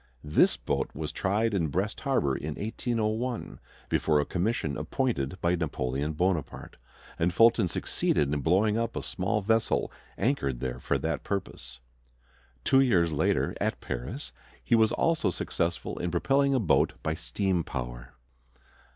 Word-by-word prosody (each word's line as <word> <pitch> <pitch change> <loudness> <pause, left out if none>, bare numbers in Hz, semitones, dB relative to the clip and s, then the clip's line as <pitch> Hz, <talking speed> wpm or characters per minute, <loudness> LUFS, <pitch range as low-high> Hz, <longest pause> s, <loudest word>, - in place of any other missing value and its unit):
This 75 0 +3
boat - - -1
was 75 0 -4
tried 105 +3 0
in 85 -5 +1
Brest 95 +8 -2
Harbor 130 - +1
in 75 +2 -4
1801, 115 +2 -2 0.3
before 75 -2 +2
a 75 - +1
commission 90 -5 -1
appointed 85 - -2
by 85 +1 +2
Napoleon 70 -2 -2
Bonaparte, 85 -1 -2 0.4
and 85 +2 +2
Fulton 115 +1 +5
succeeded 75 -3 0
in 75 - 0
blowing 105 +8 +3
up 115 0 -2
a - - -3
small 100 +4 -1
vessel 110 +2 +1 0.3
anchored 70 - 0
there 65 -1 -3
for - - 0
that - - -2
purpose. 75 -10 -4 0.9
Two 135 - +4
years 90 -11 +3
later, 75 - +1
at - - 0
Paris, - - -5 0.3
he - - 0
was 110 -1 +5
also 165 -1 +1
successful - - -2
in 90 - -1
propelling 135 +10 +2
a - - +3
boat 100 - +3
by 80 - 0
steam 95 +1 -1
power. - - -6
90 Hz, 145 wpm, -28 LUFS, 75-110 Hz, 0.9 s, Fulton